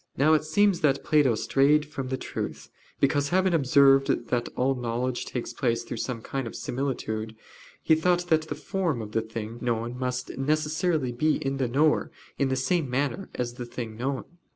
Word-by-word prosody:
Now 150 Hz, +4 st, +5 dB
it 155 Hz, -, +3 dB
seems 190 Hz, +4 st, +3 dB
that 140 Hz, -2 st, +2 dB
Plato 145 Hz, -6 st, +3 dB
strayed 145 Hz, +6 st, +3 dB
from 140 Hz, -3 st, -5 dB
the 130 Hz, 0 st, -2 dB
truth -, -, -6 dB, 0.3 s
because, 140 Hz, +1 st, +2 dB
having 185 Hz, +1 st, +2 dB
observed 135 Hz, -2 st, +5 dB, 0.2 s
that 120 Hz, -1 st, 0 dB
all 130 Hz, +2 st, +2 dB
knowledge 125 Hz, 0 st, -2 dB
takes 125 Hz, -, -4 dB
place 115 Hz, -2 st, 0 dB
through 120 Hz, -, -6 dB
some 115 Hz, -1 st, -4 dB
kind 135 Hz, -3 st, -3 dB
of -, -, -8 dB
similitude, 110 Hz, -4 st, -3 dB, 0.5 s
he -, -, +4 dB
thought 175 Hz, +2 st, +2 dB
that 160 Hz, -1 st, +2 dB
the 145 Hz, -, -4 dB
form 160 Hz, -1 st, -2 dB
of 105 Hz, -, -8 dB
the 115 Hz, -, +1 dB
thing 110 Hz, +1 st, -6 dB
known 120 Hz, 0 st, -1 dB
must 125 Hz, 0 st, -2 dB
of -, -, -9 dB
necessity 155 Hz, 0 st, 0 dB
be 155 Hz, +6 st, +1 dB
in 135 Hz, 0 st, -1 dB
the 130 Hz, -2 st, 0 dB
knower 150 Hz, +5 st, +2 dB, 0.3 s
in 140 Hz, -, +2 dB
the 130 Hz, -, +1 dB
same 145 Hz, +2 st, 0 dB
manner 140 Hz, +9 st, -1 dB
as 120 Hz, -1 st, -2 dB
in 120 Hz, -, -18 dB
the 120 Hz, -, -5 dB
thing 115 Hz, -2 st, -6 dB
known. 130 Hz, +4 st, -2 dB
135 Hz, 195 wpm, -27 LUFS, 120-155 Hz, 0.5 s, Now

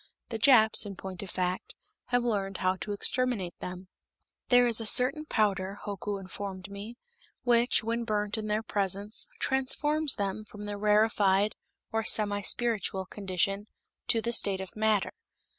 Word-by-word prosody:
The 225 Hz, -2 st, -4 dB
Japs, 220 Hz, -3 st, +5 dB
in 200 Hz, -2 st, -7 dB
point 185 Hz, -1 st, -8 dB
of 200 Hz, -, -7 dB
fact, 180 Hz, +1 st, -3 dB, 0.3 s
have 245 Hz, -1 st, +1 dB
learned 195 Hz, -5 st, -1 dB
how 185 Hz, 0 st, +1 dB
to 205 Hz, -, -6 dB
exterminate 205 Hz, -3 st, -1 dB
them. 180 Hz, +1 st, -7 dB, 0.6 s
There 245 Hz, -1 st, +6 dB
is 235 Hz, -1 st, +4 dB
a -, -, -4 dB
certain 275 Hz, +7 st, +4 dB
powder, 200 Hz, -4 st, 0 dB
Hoku 200 Hz, 0 st, -4 dB
informed 195 Hz, 0 st, -7 dB
me, 205 Hz, +4 st, -8 dB, 0.5 s
which, 240 Hz, -1 st, +3 dB
when 230 Hz, +1 st, -1 dB
burnt 210 Hz, -1 st, -1 dB
in 215 Hz, -1 st, -4 dB
their 215 Hz, +1 st, 0 dB
presence, 200 Hz, 0 st, -2 dB
transforms 295 Hz, +3 st, +1 dB
them 200 Hz, 0 st, -3 dB
from 210 Hz, 0 st, -10 dB
the 205 Hz, 0 st, -5 dB
rarefied, 210 Hz, -1 st, +3 dB, 0.4 s
or 225 Hz, 0 st, 0 dB
semi 205 Hz, -2 st, +3 dB
spiritual, 205 Hz, -3 st, 0 dB
condition 195 Hz, +1 st, -2 dB, 0.4 s
to 230 Hz, -, +3 dB
the 235 Hz, -, -1 dB
state 200 Hz, -4 st, +2 dB
of 190 Hz, -1 st, -8 dB
matter. 215 Hz, -2 st, +1 dB
210 Hz, 155 wpm, -29 LUFS, 195-230 Hz, 0.6 s, There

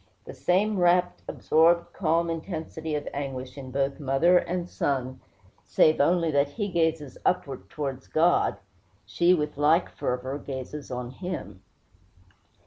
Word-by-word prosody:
The -, -, -8 dB
same 200 Hz, +3 st, +1 dB
rapt, 175 Hz, 0 st, +2 dB
absorbed, 170 Hz, +2 st, +2 dB
calm 165 Hz, -1 st, +1 dB
intensity 160 Hz, -2 st, -5 dB
of 145 Hz, -, -4 dB
anguish 130 Hz, -2 st, -5 dB
in 135 Hz, -2 st, -8 dB
both 135 Hz, +2 st, -1 dB
mother 150 Hz, +6 st, +4 dB
and 175 Hz, 0 st, -3 dB
son, 130 Hz, -5 st, -2 dB, 0.4 s
save 155 Hz, -1 st, +3 dB
only 165 Hz, +2 st, +2 dB
that 140 Hz, -1 st, +2 dB
while 145 Hz, -, -18 dB
he 205 Hz, -3 st, -2 dB
gazes 160 Hz, -5 st, -1 dB
upward 135 Hz, -, -1 dB
towards 135 Hz, -2 st, -5 dB
God, 170 Hz, +3 st, +2 dB, 0.5 s
she, 175 Hz, +1 st, +3 dB
with 150 Hz, -3 st, -3 dB
like 160 Hz, +4 st, +3 dB
fervor, 130 Hz, +3 st, -3 dB
gazes 135 Hz, +1 st, -7 dB
on 125 Hz, -1 st, -5 dB
him. 135 Hz, -, -6 dB
155 Hz, 135 wpm, -26 LUFS, 135-175 Hz, 0.5 s, mother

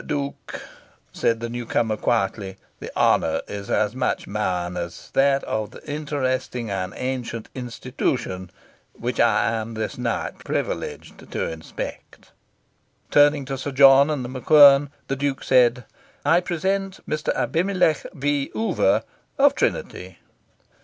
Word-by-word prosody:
"Duke," 140 Hz, -1 st, -4 dB, 0.5 s
said 115 Hz, 0 st, 0 dB
the 115 Hz, -, -2 dB
newcomer 115 Hz, -2 st, -1 dB
quietly, 100 Hz, -3 st, -1 dB, 0.2 s
"the -, -, -7 dB
honour -, -, +3 dB
is 100 Hz, -1 st, -7 dB
as 105 Hz, 0 st, +1 dB
much 125 Hz, 0 st, -1 dB
mine 90 Hz, -4 st, -2 dB
as 85 Hz, -, -6 dB
that 135 Hz, 0 st, +3 dB
of 110 Hz, -1 st, -2 dB
the -, -, -14 dB
interesting 130 Hz, -6 st, -2 dB
and 95 Hz, -1 st, -2 dB
ancient 125 Hz, -3 st, -4 dB
institution 120 Hz, -6 st, -3 dB, 0.4 s
which -, -, -4 dB
I -, -, +3 dB
am 115 Hz, 0 st, -4 dB
this 110 Hz, +2 st, -4 dB
night 120 Hz, -2 st, -2 dB
privileged -, -, -4 dB
to -, -, -2 dB
inspect." 80 Hz, 0 st, -8 dB, 0.8 s
Turning 145 Hz, -1 st, +4 dB
to 135 Hz, 0 st, -4 dB
Sir 145 Hz, -, -4 dB
John 135 Hz, +1 st, +7 dB
and 145 Hz, -5 st, -2 dB
The -, -, -6 dB
MacQuern, 140 Hz, +1 st, +6 dB, 0.2 s
the 135 Hz, -, -1 dB
Duke 140 Hz, 0 st, -2 dB
said 125 Hz, -2 st, +3 dB, 0.4 s
"I 165 Hz, +4 st, +5 dB
present 190 Hz, +2 st, -2 dB
Mr. 155 Hz, -, -1 dB
Abimelech 165 Hz, +4 st, +1 dB
V. 140 Hz, 0 st, -1 dB
Oover, 225 Hz, -, +2 dB, 0.3 s
of 285 Hz, +1 st, +5 dB
Trinity." -, -, -2 dB
130 Hz, 130 wpm, -23 LUFS, 115-145 Hz, 0.8 s, John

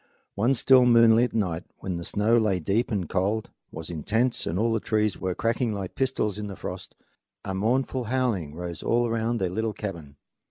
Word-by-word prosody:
One 120 Hz, +7 st, +2 dB
still 130 Hz, 0 st, +5 dB
moonlit 115 Hz, 0 st, +5 dB
night, 90 Hz, -6 st, -1 dB
when 95 Hz, -2 st, -4 dB
the 85 Hz, -, -5 dB
snow 105 Hz, +6 st, +1 dB
lay 105 Hz, -5 st, +2 dB
deep 100 Hz, +9 st, 0 dB
and 100 Hz, -6 st, -1 dB
the -, -, -9 dB
cold 100 Hz, +5 st, -1 dB, 0.2 s
was 80 Hz, +1 st, -7 dB
intense 110 Hz, -, 0 dB
and 85 Hz, -, -1 dB
all 115 Hz, +2 st, +1 dB
the 110 Hz, -, +1 dB
trees 105 Hz, -2 st, 0 dB
were 95 Hz, -1 st, -2 dB
cracking 115 Hz, 0 st, 0 dB
like 95 Hz, -2 st, -5 dB
pistols 125 Hz, -6 st, -1 dB
in 105 Hz, -, -4 dB
the 100 Hz, -, -7 dB
frost, -, -, -7 dB, 0.5 s
a 95 Hz, -, -3 dB
mournful 125 Hz, +5 st, 0 dB
howling 110 Hz, -, -1 dB
rose 85 Hz, -1 st, -6 dB
all 120 Hz, +1 st, +1 dB
around 115 Hz, +1 st, -1 dB
their 95 Hz, -4 st, -1 dB
little 110 Hz, +3 st, -1 dB
cabin. 85 Hz, -9 st, -7 dB
105 Hz, 195 wpm, -26 LUFS, 95-115 Hz, 0.5 s, still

